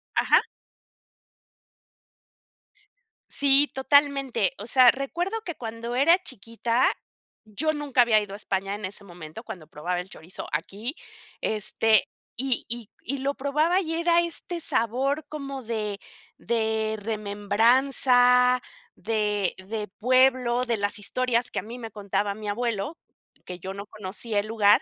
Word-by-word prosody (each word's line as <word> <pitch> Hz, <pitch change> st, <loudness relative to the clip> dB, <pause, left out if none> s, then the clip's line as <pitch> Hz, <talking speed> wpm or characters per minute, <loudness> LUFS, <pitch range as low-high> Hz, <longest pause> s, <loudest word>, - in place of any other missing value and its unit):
Ajá. -, -, +5 dB, 2.9 s
Sí, 280 Hz, +1 st, +5 dB
totalmente. 275 Hz, -6 st, +2 dB
O 205 Hz, -, -6 dB
sea, 255 Hz, -2 st, +7 dB
recuerdo 350 Hz, +11 st, -3 dB
que 345 Hz, -, -5 dB
cuando 230 Hz, +1 st, -5 dB
era 330 Hz, +7 st, +5 dB
chiquita, 230 Hz, -, -1 dB, 0.6 s
yo 295 Hz, +9 st, -1 dB
nunca 290 Hz, -4 st, +1 dB
había 225 Hz, -3 st, +5 dB
ido 205 Hz, -1 st, -6 dB
a -, -, -5 dB
España 195 Hz, -1 st, -2 dB
en 205 Hz, -2 st, -6 dB
ese 200 Hz, +2 st, -4 dB
momento, 170 Hz, -4 st, -10 dB
cuando 160 Hz, -5 st, -9 dB
probaba 175 Hz, +4 st, -3 dB
el 180 Hz, +2 st, -7 dB
chorizo 170 Hz, +4 st, -9 dB
aquí, 200 Hz, -, -3 dB, 0.5 s
este, 220 Hz, 0 st, +2 dB, 0.3 s
y 265 Hz, -1 st, 0 dB
y 235 Hz, -2 st, -4 dB
y 280 Hz, +3 st, -3 dB
lo 280 Hz, +1 st, -1 dB
probaba 300 Hz, +6 st, +1 dB
y 325 Hz, -2 st, -3 dB
era 340 Hz, 0 st, +3 dB
este 340 Hz, 0 st, -3 dB
sabor 270 Hz, +4 st, 0 dB
como 275 Hz, -3 st, -6 dB
de 215 Hz, -3 st, -3 dB, 0.4 s
de 220 Hz, -1 st, 0 dB
remembranza, 245 Hz, +4 st, +3 dB, 0.3 s
de 210 Hz, -3 st, 0 dB
de 210 Hz, +3 st, -5 dB
pueblo, 255 Hz, 0 st, +3 dB
de 235 Hz, -2 st, 0 dB
las 205 Hz, +1 st, -1 dB
historias 245 Hz, +3 st, 0 dB
que -, -, -2 dB
a -, -, -4 dB
mí 235 Hz, +3 st, -9 dB
me 225 Hz, -2 st, -7 dB
contaba 200 Hz, 0 st, -2 dB
mi 215 Hz, 0 st, -8 dB
abuelo, 235 Hz, +6 st, -2 dB, 0.5 s
que 180 Hz, 0 st, -7 dB
yo 190 Hz, +2 st, -6 dB
no 200 Hz, +1 st, -7 dB
conocía 210 Hz, +1 st, -2 dB
el 210 Hz, -, -3 dB
lugar. 210 Hz, -2 st, +4 dB
230 Hz, 140 wpm, -26 LUFS, 205-270 Hz, 2.9 s, sea